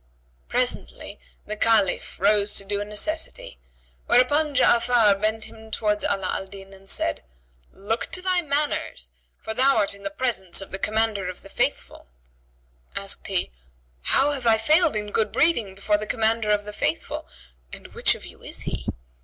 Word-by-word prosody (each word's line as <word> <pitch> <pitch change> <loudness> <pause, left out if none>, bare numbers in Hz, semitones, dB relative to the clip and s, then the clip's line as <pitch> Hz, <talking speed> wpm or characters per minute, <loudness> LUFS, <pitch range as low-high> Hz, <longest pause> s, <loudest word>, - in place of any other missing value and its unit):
Presently - - -2 0.3
the 215 - -3
Caliph 215 -3 +1
rose 205 +1 +3
to - - 0
do 200 +1 -2
a - - -3
necessity; 210 - -3 0.5
whereupon 290 +4 +3
Ja'afar 235 -5 +4
bent 215 +1 0
him 220 0 -12
towards 210 -1 0
Ala 195 -2 0
al 195 - -4
Din 195 0 -12
and 195 0 -13
said, 95 - +1 0.5
"Look 215 +4 -3
to 365 - 0
thy 365 -1 +2
manners, 285 - -2 0.3
for 220 - -2
thou 260 +2 +3
art 205 -2 +2
in 200 - -11
the 200 - -3
presence 200 -5 -1
of 195 - -8
the 195 - -4
Commander 215 -3 0
of 185 - -9
the - - -13
Faithful - - -2 0.4
" - - -36
Asked 195 0 -3
he, 190 -2 -1 0.5
"How 275 - +4
have 265 -4 -2
I 225 -1 +5
failed 310 +6 +3
in 210 -1 -3
good 220 - 0
breeding 235 - +2
before 205 +1 +1
the 215 - -5
Commander 225 0 +1
of 205 -1 +2
the 210 - -7
Faithful, - - -2 0.4
and - - -11
which - - +2
of - - -9
you - - -13
is - - -5
he?" - - -5
210 Hz, 175 wpm, -24 LUFS, 195-240 Hz, 0.5 s, I